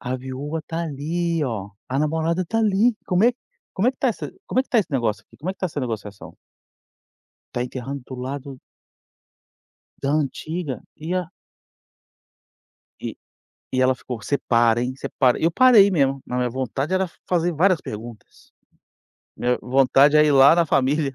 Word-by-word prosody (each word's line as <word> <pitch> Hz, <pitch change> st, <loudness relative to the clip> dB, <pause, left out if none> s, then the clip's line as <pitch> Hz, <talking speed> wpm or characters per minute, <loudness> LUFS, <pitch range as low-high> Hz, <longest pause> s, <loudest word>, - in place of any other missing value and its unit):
a 125 Hz, +1 st, -3 dB
viúva 135 Hz, +5 st, -5 dB
tá, 165 Hz, 0 st, -3 dB
ali, 165 Hz, +2 st, -2 dB
ó, 105 Hz, -6 st, -4 dB, 0.2 s
a 135 Hz, +2 st, -1 dB
namorada 160 Hz, +4 st, 0 dB
tá, 225 Hz, +6 st, -2 dB
ali. 220 Hz, +2 st, +3 dB
Como 180 Hz, +4 st, +2 dB
é 245 Hz, -, +5 dB, 0.4 s
como 205 Hz, +5 st, +1 dB
é -, -, +4 dB
que 260 Hz, -, -20 dB
tá 265 Hz, -, +2 dB
essa 230 Hz, -, -4 dB, 0.2 s
como 255 Hz, -, +1 dB
é -, -, +1 dB
que -, -, -29 dB
tá 240 Hz, -, +3 dB
esse 205 Hz, -, 0 dB
negócio 115 Hz, -6 st, -1 dB
aqui? -, -, -21 dB
Como 170 Hz, +6 st, -4 dB
é -, -, -3 dB
que 190 Hz, -, -25 dB
tá 185 Hz, -, -1 dB
essa 150 Hz, -4 st, -5 dB
negociação? 105 Hz, -5 st, -6 dB, 1.2 s
Tá 120 Hz, -, -2 dB
enterrando 130 Hz, +2 st, -6 dB
do 130 Hz, -, -8 dB
lado 135 Hz, +1 st, -6 dB, 1.4 s
da 140 Hz, -, 0 dB
antiga. 155 Hz, 0 st, -2 dB
E 160 Hz, +3 st, -5 dB
a 180 Hz, -2 st, -1 dB, 1.7 s
Eh, -, -, -5 dB, 0.6 s
e 130 Hz, -, +1 dB
ela 130 Hz, 0 st, +4 dB
ficou: 125 Hz, -2 st, -7 dB
"Você 140 Hz, -, 0 dB
para, 120 Hz, -1 st, +4 dB
hein? 125 Hz, +1 st, -2 dB
Você -, -, -5 dB
para." 125 Hz, -3 st, +4 dB
Eu 165 Hz, -, +3 dB
parei 220 Hz, -1 st, +6 dB
mesmo, 135 Hz, -6 st, +1 dB
mas 125 Hz, -, -3 dB
minha 125 Hz, -1 st, 0 dB
vontade 130 Hz, +6 st, -2 dB
era 190 Hz, 0 st, +2 dB
f 175 Hz, -, -11 dB
fazer 175 Hz, -1 st, +1 dB
várias 175 Hz, +2 st, +3 dB
perguntas. 110 Hz, +1 st, -10 dB, 0.8 s
Minha 125 Hz, 0 st, 0 dB
vontade 135 Hz, +3 st, +4 dB
é 150 Hz, -, +6 dB
ir 150 Hz, -, +3 dB
lá 135 Hz, +2 st, +7 dB
na 170 Hz, -1 st, +2 dB
família 140 Hz, 0 st, +1 dB
145 Hz, 180 wpm, -23 LUFS, 130-175 Hz, 1.7 s, lá